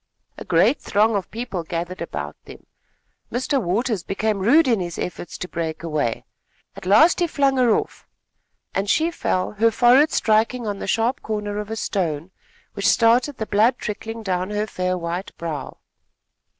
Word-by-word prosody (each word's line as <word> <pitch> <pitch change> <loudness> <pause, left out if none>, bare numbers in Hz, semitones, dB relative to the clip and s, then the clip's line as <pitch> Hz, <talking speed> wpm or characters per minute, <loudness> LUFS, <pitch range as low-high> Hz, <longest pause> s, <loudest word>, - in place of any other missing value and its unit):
A - - -6
great 190 - +3
throng 215 +2 +2
of 195 -3 -2
people 230 -5 -4
gathered 170 +2 -5
about 75 - -5
them. - - -13 0.7
Mr. 260 +3 0
Waters 210 +2 0
became 205 +3 -1
rude 270 +11 +4
in 230 -4 +3
his 175 -2 -4
efforts 175 - -5
to 180 - -5
break 165 -2 -4
away. 150 -8 -2 0.5
At 195 -2 -9
last 225 - +6
he 350 - +2
flung 275 -3 +1
her 245 -4 +4
off, - - -4 0.7
and 195 +1 -1
she 320 +7 +2
fell, 185 - -1
her 220 +2 +3
forehead 250 +6 +5
striking 225 +3 +1
on 205 -2 -3
the - - -5
sharp 230 +5 0
corner 210 -1 -3
of 210 0 -6
a 220 - -3
stone, 175 -6 -2 0.4
which - - -1
started 245 +4 +3
the 220 - -3
blood 220 +5 +3
trickling 225 +1 -5
down 185 -1 -1
her 210 0 -1
fair 185 -3 -2
white 175 +2 -5
brow. 155 -5 -5
210 Hz, 170 wpm, -22 LUFS, 180-235 Hz, 0.7 s, last